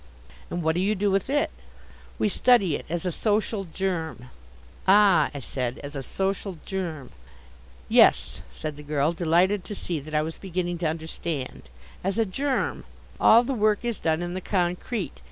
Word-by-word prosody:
"And 175 -1 -3
what 160 0 +2
do 175 - 0
you 205 +3 +1
do 200 +1 +1
with 195 +4 0
it?" 290 +1 +1 0.7
"We - - +2
study 205 - +4
it - - -7
as 175 +2 -2
a 180 - 0
Social 210 +1 0
Germ." 165 -7 -3 0.6
"Ah," 200 -2 +6
I 145 - -7
said, 125 -1 -3
"as 145 +1 -7
a 135 - -3
Social 195 +4 -2
Germ." 170 -8 -4 0.8
"Yes," - - +4
said 145 - -6
the - - -8
girl, 150 +1 0
delighted 175 +4 +2
to 205 - -5
see 170 -4 -3
that 155 +2 -7
I 150 - +3
was 160 +1 -6
beginning 175 -2 -3
to 170 - 0
understand, 160 - -5 0.3
"as 195 +3 -1
a 225 - +3
Germ. 270 +7 -1 0.4
All 230 +2 +7
the 270 +2 -2
work 215 -1 +1
is 235 -4 -2
done 160 +1 0
in 175 0 -4
the 185 - -4
concrete. 180 +3 -1
180 Hz, 175 wpm, -26 LUFS, 160-205 Hz, 0.8 s, All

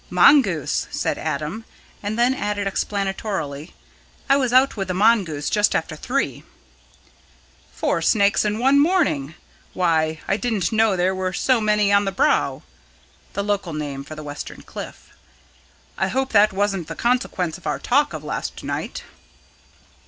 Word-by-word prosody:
"Mongoose," 200 - +4
said - - -2
Adam, 155 +7 -3 0.4
and 210 +2 -3
then 245 +2 +3
added 205 -5 -2
explanatorily: 195 -6 -3 0.5
"I 275 - +5
was 260 -3 +1
out 260 +2 +4
with 195 -3 -3
the 185 - -2
mongoose 190 -8 +2
just 210 -1 +2
after 160 -1 -2
three." 255 - -2 1.3
"Four - - -1
snakes 200 -2 +3
in 210 0 -1
one 270 +4 +4
morning! 285 - +1 0.4
Why, 160 -3 +1
I 195 - +1
didn't 220 -3 -1
know 220 -2 +3
there 180 +2 +1
were 185 0 -2
so 250 +4 +2
many 210 -1 +2
on 200 0 +4
the 195 - -1
Brow" 190 - +1 0.7
the 200 - -2
local 200 -4 -2
name 145 -2 -4
for 155 +3 -9
the 155 - -8
western 145 0 -8
cliff. - - -10 0.9
"I - - +2
hope 265 +1 -1
that 210 -1 +5
wasn't 195 -3 -1
the - - -6
consequence 195 -8 -1
of - - -9
our - - 0
talk 285 +4 +1
of - - -7
last - - -5
night?" - - -4
200 Hz, 150 wpm, -22 LUFS, 170-230 Hz, 1.3 s, I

